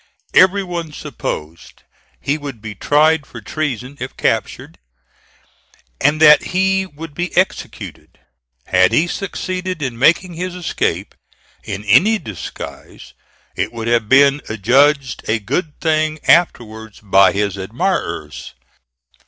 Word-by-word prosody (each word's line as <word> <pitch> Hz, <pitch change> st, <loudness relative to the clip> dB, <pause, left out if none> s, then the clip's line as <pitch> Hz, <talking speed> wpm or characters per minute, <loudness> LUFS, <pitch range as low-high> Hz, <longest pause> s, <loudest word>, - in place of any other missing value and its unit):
Every 190 Hz, +2 st, +5 dB
one 170 Hz, -3 st, -5 dB
supposed 85 Hz, -, -7 dB, 0.4 s
he 140 Hz, -, -1 dB
would 140 Hz, -6 st, -7 dB
be 110 Hz, 0 st, -7 dB
tried 150 Hz, +7 st, +2 dB
for -, -, -10 dB
treason 140 Hz, -4 st, -4 dB
if 130 Hz, +1 st, -7 dB
captured, -, -, -2 dB, 1.2 s
and 145 Hz, +2 st, +3 dB
that 150 Hz, -1 st, +8 dB, 0.2 s
he 190 Hz, 0 st, +2 dB
would 160 Hz, -1 st, -10 dB
be 175 Hz, +3 st, -4 dB
executed. 185 Hz, +1 st, -2 dB, 0.5 s
Had 95 Hz, 0 st, +3 dB
he 160 Hz, -, +3 dB
succeeded 185 Hz, -2 st, -4 dB
in 120 Hz, -4 st, -4 dB
making 170 Hz, +6 st, +3 dB
his 180 Hz, +2 st, -5 dB
escape 175 Hz, -4 st, -2 dB, 0.5 s
in 100 Hz, +1 st, -5 dB
any 175 Hz, -, +5 dB
disguise 90 Hz, -, -9 dB, 0.4 s
it -, -, -2 dB
would 115 Hz, -1 st, -6 dB
have 115 Hz, -3 st, +1 dB
been 140 Hz, +1 st, +5 dB
adjudged 130 Hz, +5 st, +2 dB
a 110 Hz, -, +2 dB
good 145 Hz, -, -3 dB
thing 155 Hz, -1 st, 0 dB
afterwards 110 Hz, -, +1 dB
by 95 Hz, -1 st, +4 dB
his 100 Hz, -1 st, -1 dB
admirers. 95 Hz, -1 st, -3 dB
145 Hz, 120 wpm, -18 LUFS, 110-170 Hz, 1.2 s, that